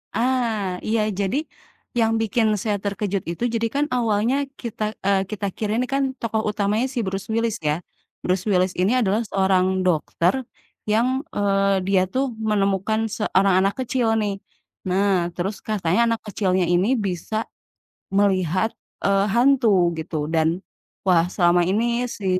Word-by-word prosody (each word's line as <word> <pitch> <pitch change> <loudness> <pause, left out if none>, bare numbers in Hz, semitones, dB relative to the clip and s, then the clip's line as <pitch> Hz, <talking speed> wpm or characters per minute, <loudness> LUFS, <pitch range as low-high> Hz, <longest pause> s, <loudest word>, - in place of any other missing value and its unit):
Ah, 225 -7 0
iya 220 0 +2 0.2
jadi, 200 +7 0 0.6
yang 225 -1 +3
bikin 225 +1 +1 0.2
saya 210 -2 0
terkejut 200 -1 -2
itu, 175 - -5
jadi 230 0 +1
kan 290 +1 +2
awalnya 230 +1 +1 0.3
kita 230 -3 -4 0.2
eee, 195 -1 +3
kita 210 -1 -3
kira 210 -1 -2
ini 250 0 0
kan 275 0 +2 0.2
tokoh 220 -1 -1
utamanya 210 +4 0
si 245 - -1
Bruce 195 +1 -4
Willis 230 -1 0
ya. 150 - +2 0.5
Bruce 185 +2 0
Willis 185 -1 +2
ini 195 +5 +3
adalah 210 +2 +1
seorang 190 -1 +2 0.2
dokter 170 +1 +1 0.6
yang, 230 +3 +3 0.3
eee, 195 -1 +2
dia 195 -2 +3
tuh 265 +1 +1 0.2
menemukan 200 +1 +1
seorang 195 -3 +2
anak 195 +1 +2
kecil 245 -1 0
nih, 205 -1 -1 0.5
nah 195 +2 +2 0.3
terus 195 +3 -2
katanya 195 -2 0
anak 230 -1 0
kecilnya 185 -2 +1
ini 180 +4 +3 0.2
bisa 180 +3 -3 0.8
melihat, 190 +1 +2 0.3
eee, 195 0 +3
hantu 255 -1 +4 0.3
gitu 160 0 -4 0.2
dan 160 0 +3 0.6
wah, 170 -2 +5
selama 175 -2 +3
ini 220 +4 +1 0.3
si 200 - -8
200 Hz, 145 wpm, -22 LUFS, 190-225 Hz, 0.8 s, wah